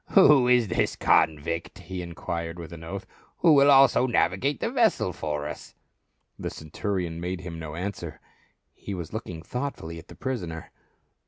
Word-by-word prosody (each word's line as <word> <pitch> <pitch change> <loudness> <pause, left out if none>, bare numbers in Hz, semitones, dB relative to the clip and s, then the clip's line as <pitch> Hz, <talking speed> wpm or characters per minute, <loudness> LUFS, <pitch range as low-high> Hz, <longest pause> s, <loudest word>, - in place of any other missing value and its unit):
"Who 150 -10 +7
is 125 -4 +4
this - - 0
convict," 80 +2 +1
he 90 0 -6
enquired 85 -1 -5
with 85 0 -8
an 85 -1 -9
oath, 95 +4 -6 0.3
"who 165 -3 +5
will 140 0 +6
also 135 -2 +6
navigate 120 - +1
the 230 - -1
vessel 225 - +2
for 75 -2 -3
us 75 - -9 0.3
?" - - -45
The - - -3
centurion 85 +1 -4
made 90 +1 -3
him 85 -2 -7
no 80 -1 -6
answer, 90 -2 -5 0.5
he 100 - -6
was 85 -1 -7
looking 90 -7 -6
thoughtfully 85 - -5
at 80 - -14
the - - -12
prisoner. 90 -12 -4
90 Hz, 165 wpm, -26 LUFS, 80-125 Hz, 0.5 s, Who